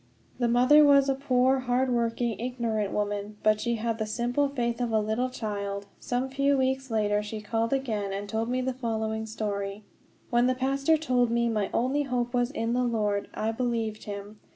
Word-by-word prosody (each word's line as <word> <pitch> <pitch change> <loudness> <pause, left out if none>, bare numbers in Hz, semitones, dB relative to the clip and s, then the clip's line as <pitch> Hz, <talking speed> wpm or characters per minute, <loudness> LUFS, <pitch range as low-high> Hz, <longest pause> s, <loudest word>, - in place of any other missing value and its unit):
The 240 - +2
mother 255 +6 +6
was 280 -1 +5
a - - +4
poor, 265 -1 +2
hard 255 +1 +1
working, 235 -2 0
ignorant 230 -4 -2
woman, 205 0 -2
but 215 0 +3
she 235 0 0
had 230 0 -2
the 220 - -1
simple 245 +6 0
faith 240 -3 -2
of 240 - 0
a 220 - +3
little 220 +4 0
child. 200 -4 -4
Some 250 +1 -1
few 275 +1 +2
weeks 265 0 0
later 210 -2 +1
she 210 +1 -6
called 225 +2 -1
again, 220 -7 -1
and 200 +1 -4
told 220 +3 -2
me 255 +1 0
the 260 0 -1
following 220 -3 -2
story: 205 -2 -4 0.5
"When 240 +1 +4
the 255 - +2
pastor 275 +4 +2
told 250 -6 +1
me 235 0 +1
my 210 -3 0
only 265 +5 +1
hope 250 -3 -2
was 245 -1 +1
in 230 -5 -2
the 250 +1 +1
Lord, 210 -4 0
I 220 +1 -1
believed 225 -2 -2
him. 205 +1 -7
235 Hz, 195 wpm, -27 LUFS, 215-255 Hz, 0.5 s, mother